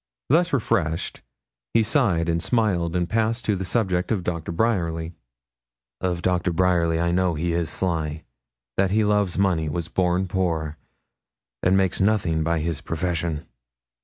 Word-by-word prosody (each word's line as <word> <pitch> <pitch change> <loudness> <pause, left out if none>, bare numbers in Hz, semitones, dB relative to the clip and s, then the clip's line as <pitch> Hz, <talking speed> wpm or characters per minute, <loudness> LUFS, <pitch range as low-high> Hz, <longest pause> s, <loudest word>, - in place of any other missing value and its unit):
Thus 170 +5 +3
refreshed, 85 - 0 0.5
he 115 - +5
sighed 105 - +1
and 85 0 +1
smiled, 95 -4 +1
and 90 -1 +1
passed 115 +3 0
to 105 - +2
the 95 - -3
subject 90 -3 0
of 100 -5 0
Doctor 85 -2 -3
Bryerly. 85 -4 0 0.9
'Of 90 -2 -1
Doctor 90 -1 +1
Bryerly, 85 -2 +2
I 85 0 +1
know 90 -1 +1
that 75 - -4
he 85 0 0
is 85 -1 0
sly, 80 -4 -2 0.5
that 95 0 +3
he 110 +3 +2
loves 105 -3 +1
money, 90 -5 +1
was 85 +2 -3
born 90 0 +1
poor, 80 -5 -1 0.8
and 95 +1 +3
makes 95 0 +1
nothing 95 -6 +2
by 85 +1 +1
his 80 -2 -2
profession. 85 -2 -2
90 Hz, 155 wpm, -24 LUFS, 85-95 Hz, 0.9 s, he